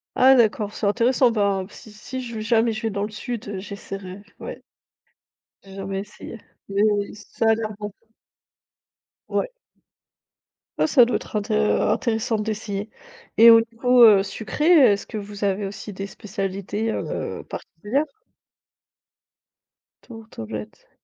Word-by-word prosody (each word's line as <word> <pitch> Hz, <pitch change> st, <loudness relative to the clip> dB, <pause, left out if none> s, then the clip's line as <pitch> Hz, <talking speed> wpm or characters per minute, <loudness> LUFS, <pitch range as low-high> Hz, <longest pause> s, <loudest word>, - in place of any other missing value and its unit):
Ah 265 Hz, +1 st, +7 dB
d'accord, 215 Hz, -3 st, +2 dB
c'est 210 Hz, -, -3 dB
intéressant. 240 Hz, +3 st, +3 dB
Ben 200 Hz, -3 st, +1 dB
si 215 Hz, -, -14 dB
si 255 Hz, +5 st, -7 dB
je 235 Hz, -2 st, -7 dB
v 215 Hz, -, -4 dB
jamais 230 Hz, 0 st, +2 dB
je 215 Hz, +2 st, -5 dB
vais 225 Hz, -, +1 dB
dans 200 Hz, 0 st, -3 dB
le 210 Hz, -, -3 dB
sud, 225 Hz, +1 st, -6 dB
heu, 200 Hz, -2 st, -4 dB
j'essaierai, 195 Hz, -1 st, -8 dB, 0.2 s
ouais. -, -, -7 dB, 1.0 s
J'ai 195 Hz, -1 st, -14 dB
jamais 195 Hz, 0 st, -4 dB
essayé, 210 Hz, +2 st, -10 dB, 0.3 s
mais 200 Hz, +1 st, 0 dB, 0.3 s
ça 225 Hz, +2 st, -2 dB
a 220 Hz, -, +5 dB
l'air 220 Hz, -1 st, -4 dB
bon. 210 Hz, -1 st, -5 dB, 1.4 s
Ouais. -, -, -2 dB, 1.3 s
Ah -, -, +3 dB
ça 250 Hz, -6 st, +6 dB
doit 240 Hz, -, 0 dB
être -, -, -11 dB
inté 210 Hz, +1 st, -1 dB
intéressant 220 Hz, +1 st, +1 dB
d'essayer 210 Hz, -1 st, -4 dB, 0.5 s
et 230 Hz, +1 st, +10 dB
au 230 Hz, -, +8 dB
niveau, 245 Hz, +1 st, +4 dB
heu, 200 Hz, -3 st, +7 dB
sucré 220 Hz, +9 st, -4 dB, 0.3 s
est-ce 200 Hz, -, -4 dB
que 215 Hz, -, -6 dB
vous 205 Hz, 0 st, -7 dB
avez 200 Hz, 0 st, 0 dB
aussi 205 Hz, +1 st, -8 dB
des 195 Hz, +1 st, -5 dB
spécialités, 200 Hz, +1 st, -4 dB
heu, -, -, -4 dB
particulières? 265 Hz, +8 st, -3 dB, 2.0 s
Tourte 225 Hz, -2 st, -12 dB
aux 110 Hz, -, -4 dB
blettes. 105 Hz, -1 st, -8 dB
215 Hz, 145 wpm, -23 LUFS, 200-230 Hz, 2.0 s, et